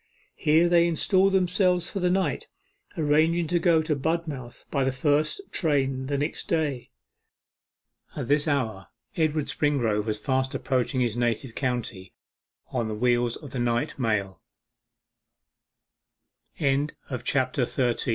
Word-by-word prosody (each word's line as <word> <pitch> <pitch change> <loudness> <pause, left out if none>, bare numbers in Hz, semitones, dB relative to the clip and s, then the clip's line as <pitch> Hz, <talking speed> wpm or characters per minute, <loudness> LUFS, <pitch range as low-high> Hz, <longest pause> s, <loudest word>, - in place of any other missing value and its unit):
Here 160 +3 +3
they 170 0 +4
installed 190 +3 +2
themselves 180 -1 +2
for 195 - -4
the 180 -1 +1
night, 195 - 0 0.5
arranging 160 +2 +2
to 175 0 +2
go 165 -3 +3
to 155 -1 0
Budmouth 145 -4 -3
by 140 -2 +1
the 135 - +1
first 145 - +1
train 135 -5 0
the 140 0 -1
next 145 +3 -3
day. 150 -7 -1 1.3
At - - -4
this 145 +3 +2
hour 115 -10 -1 0.3
Edward 155 -2 +1
Springrove 120 -10 0
was 110 -1 -1
fast 130 +3 -1
approaching 130 0 0
his 120 -2 0
native 120 0 -1
county 120 -8 -3 0.6
on 115 - -1
the 110 - -3
wheels 120 +1 +1
of 145 -5 -10
the 130 - -4 3.0
n 140 0 +1
145 Hz, 120 wpm, -26 LUFS, 125-165 Hz, 3.0 s, they